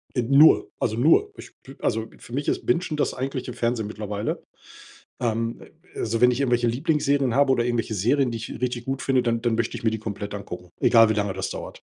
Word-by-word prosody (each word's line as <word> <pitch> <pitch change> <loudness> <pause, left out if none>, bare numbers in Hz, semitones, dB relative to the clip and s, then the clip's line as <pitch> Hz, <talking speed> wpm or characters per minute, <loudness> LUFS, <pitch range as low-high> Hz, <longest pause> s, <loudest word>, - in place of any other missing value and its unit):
Äh, 125 - +2
nur, 140 +6 +5
also 110 -2 0
nur. 165 - +4
Ich - - -11
b 135 - -12
also 115 0 -1
für 120 - -13
mich 140 +2 -2
ist - - -1
Bingen 145 +8 +2 0.2
das - - 0
eigentliche 130 -1 -4
Fernsehen 115 -2 -1
mittlerweile. 105 0 -4 0.8
Ähm, 115 -1 -2 0.3
also 115 0 -2
wenn 125 - +6
ich 125 +2 -2
irgendwelche 120 -3 +2
Lieblingsserien 140 0 +1
habe 140 -1 +4
oder 120 -2 +1
irgendwelche 120 -2 -1
Serien, 125 +7 +2
die 115 - -4
ich 110 +1 -7
richtig 125 -1 -2
gut 135 0 -3
finde, 130 -2 +2
dann 115 -1 0
dann 120 -2 +1
möchte 115 0 -1
ich - - -9
mir 110 - +3
die 110 - -3
komplett 105 -1 -6
angucken, 90 -3 -8
egal 115 -2 +6
wie - - +2
lange 105 -2 -1
das 95 0 -4
dauert. - - -7
120 Hz, 215 wpm, -24 LUFS, 110-130 Hz, 0.8 s, wenn